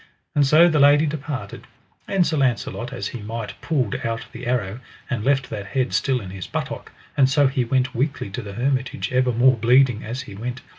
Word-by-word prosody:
And 145 -2 +3
so 155 +5 +7
the 160 -3 +2
lady 145 +2 +6
departed, 145 -2 -5 0.4
and 190 -3 +2
Sir 160 - 0
Launcelot 125 -2 -1
as 105 -7 -4
he 120 - -7
might 110 +1 -5
pulled 130 -10 0
out 115 -1 -3
the - - -8
arrow, 120 -3 -1 0.3
and 115 -5 -1
left 135 0 +1
that 100 -2 -5
head 130 +4 -1
still 130 -2 +1
in 95 -2 -8
his 95 -2 -7
buttock, - - -5 0.2
and 135 -2 +4
so 145 +1 +4
he 130 -1 +1
went 125 +1 0
weakly 135 -5 -2
to 115 - -4
the 100 -3 -8
hermitage 125 -4 -1
ever 125 0 +2
more 125 +3 +4
bleeding 125 0 +4
as 120 +4 -4
he 100 - -11
went. 125 +5 -5
125 Hz, 205 wpm, -22 LUFS, 115-140 Hz, 0.4 s, so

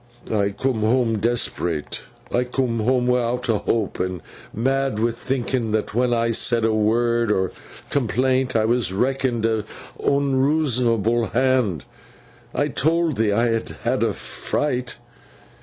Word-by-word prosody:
'I 100 -2 +2
coom 130 -2 0
home 115 0 +2
desp'rate. 100 -9 -1 0.3
I 125 - +2
coom 125 -2 -1
home 125 +3 +2
wi'out 125 0 0
a 110 -3 +2
hope, 110 -4 -1
and 90 -2 -2 0.3
mad 135 +1 0
wi' 115 +2 +1
thinking 120 -1 -2
that 110 -2 -1
when 125 +2 +1
I 115 -1 +1
said 115 0 +2
a 110 - +2
word 115 +1 +2
o' 95 -3 +1 0.4
complaint 130 0 +1
I 110 -1 +3
was 115 -4 +2
reckoned 125 +2 0
a 110 -2 +1 0.4
unreasonable 130 -5 +2
Hand. 130 - +1 0.7
I - - 0
told 160 0 +1
thee 110 -1 +2
I 115 +3 +2
had 115 0 -1
had - - 0
a - - +1
fright. 125 -4 -2
120 Hz, 140 wpm, -22 LUFS, 110-130 Hz, 0.7 s, I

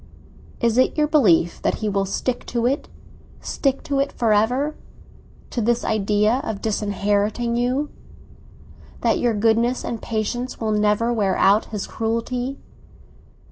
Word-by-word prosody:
"Is 235 0 +2
it 260 - +2
your 300 - +4
belief 200 - +3
that - - +1
he 215 - -3
will 195 -1 0
stick 245 +5 -2
to 235 -1 -1
it—stick 275 0 -3
to 280 -3 -1
it 275 +1 0
for 225 -3 +1
ever, 250 +8 +1 0.8
to 240 - -1
this 235 +2 +1
idea 210 +3 +2
of 215 -3 -4
disinheriting 210 +2 0
you?—that 255 +5 -4
your 240 -2 +1
goodness 230 +3 +2
and 230 - -4
patience 235 +3 -3
will 220 -1 -1
never 210 +3 +2
wear 200 -4 +1
out 200 +3 +4
his 210 -3 -5
cruelty?" 245 +4 -2
230 Hz, 135 wpm, -22 LUFS, 210-250 Hz, 0.8 s, your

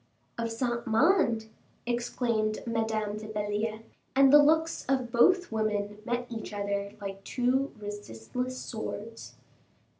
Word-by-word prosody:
"Of 230 -1 -2
Saint 235 +1 -2
Mande?" 235 - +3 0.4
exclaimed 235 -2 -1
Madame 220 -2 -1
de 215 0 -7
Belliere; 210 +1 -2 0.3
and 270 0 +6
the 295 - +10
looks 320 +2 +3
of 260 -3 +1
both 355 +9 +4
women 210 -1 -1
met 240 0 -1
each 225 -2 -6
other 200 0 -2
like 195 -1 -6
two 255 +4 +1
resistless 205 - -5
swords. 225 0 -6
225 Hz, 120 wpm, -29 LUFS, 210-250 Hz, 0.4 s, the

